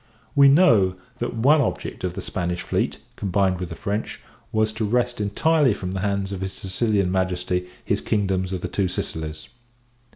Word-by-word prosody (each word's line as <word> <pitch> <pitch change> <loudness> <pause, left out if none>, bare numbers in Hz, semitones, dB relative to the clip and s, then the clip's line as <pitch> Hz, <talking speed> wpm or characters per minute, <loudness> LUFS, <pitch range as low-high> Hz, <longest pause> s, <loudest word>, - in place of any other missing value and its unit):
We 140 -1 +7
know, 125 - +5 0.2
that 120 - -2
one 140 +7 +5
object 130 - -3
of 90 -1 -2
the - - -5
Spanish 90 -1 -3
fleet, - - -1 0.2
combined 95 -2 +1
with 90 -2 -4
the 85 - -6
French, 100 +5 -3 0.3
was 110 0 +1
to 110 0 -3
wrest 120 +2 0
entirely 135 +5 +3
from 90 -2 -5
the 95 - -3
hands 100 0 -1
of 95 -2 -4
his 95 0 -3
Sicilian 100 -1 0
Majesty 90 -1 -1 0.2
his - - 0
kingdoms 95 -3 0
of 95 -2 -3
the - - -2
Two 100 -2 0
Sicilies. 80 -3 -5
100 Hz, 175 wpm, -23 LUFS, 90-110 Hz, 0.3 s, We